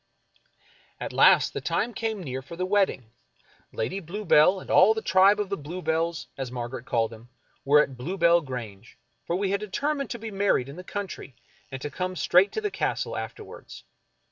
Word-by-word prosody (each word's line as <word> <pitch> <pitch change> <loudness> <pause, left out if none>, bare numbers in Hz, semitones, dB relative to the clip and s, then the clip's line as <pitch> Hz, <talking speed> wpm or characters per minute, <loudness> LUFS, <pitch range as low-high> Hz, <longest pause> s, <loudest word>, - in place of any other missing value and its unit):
At - - -5
last - - +5
the - - -4
time 240 - -1
came 220 -4 -3
near 130 -3 -5
for 140 +6 -10
the 185 +2 -2
wedding. 185 - 0 0.6
Lady 190 +12 -3
Blue 195 +4 -7
bell 180 +5 +5
and - - -8
all 205 +4 +6
the 220 - -3
tribe 195 +2 +5
of 205 -2 -2
Bluebells, 165 +1 -2
as 130 -2 -4
Margaret 120 0 -6
called 115 -1 0
them, 115 +1 -13 0.3
were 150 +2 +5
at 135 -3 -8
Bluebell 170 +4 +2
Grange, 120 -6 -8 0.3
for 170 - 0
we 195 +1 -1
had 200 - +1
determined 275 +7 -2
to - - -4
be 225 -1 -7
mar 200 0 +2
ried 125 +1 -2
in 140 - -9
the 180 - -9
country, 195 - -6 0.4
and 130 - -5
to 145 - -4
come 185 +3 -3
straight 180 +3 +4
to 435 - -2
the 420 -1 -2
Castle - - -2
after - - -6
wards. - - -12
180 Hz, 195 wpm, -26 LUFS, 135-200 Hz, 0.6 s, all